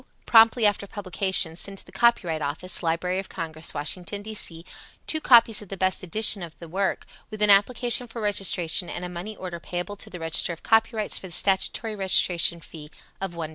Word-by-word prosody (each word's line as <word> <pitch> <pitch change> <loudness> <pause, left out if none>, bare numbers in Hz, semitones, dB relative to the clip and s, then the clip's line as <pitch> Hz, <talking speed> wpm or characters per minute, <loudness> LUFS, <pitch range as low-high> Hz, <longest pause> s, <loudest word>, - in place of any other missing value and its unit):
Promptly 225 0 +5
after 205 -1 0
publication, 190 -4 +1
send 195 +3 -6
to - - -8
the - - -17
Copyright 180 -10 +1
Office, 155 +6 -4
Library 180 +2 -2
of 195 - -8
Congress, 160 -1 -3
Washington, 180 +7 -4
D. 220 +1 -8
C., 165 -5 -1 0.4
two 315 - 0
copies 230 -5 +5
of 205 - -13
the 195 - -7
best 185 0 0
edition 210 +3 +2
of 165 -2 -9
the 170 - -11
work, 190 +4 -2 0.2
with 215 - -9
an 210 - +6
application 240 +4 +3
for 230 - -9
registration 190 -4 +2
and 180 - -6
a - - -6
money 180 +5 -8
order 180 -3 -8
payable 175 +5 -6
to - - -7
the 180 - -9
Register 165 +1 +2
of 165 - -14
Copyrights 225 -1 +1
for 190 - -10
the - - -14
statutory 200 +5 0
registration 180 -3 +3
fee 155 -2 -12 0.3
of 190 -3 -5
$l. 165 -1 -4
190 Hz, 200 wpm, -24 LUFS, 170-210 Hz, 0.4 s, an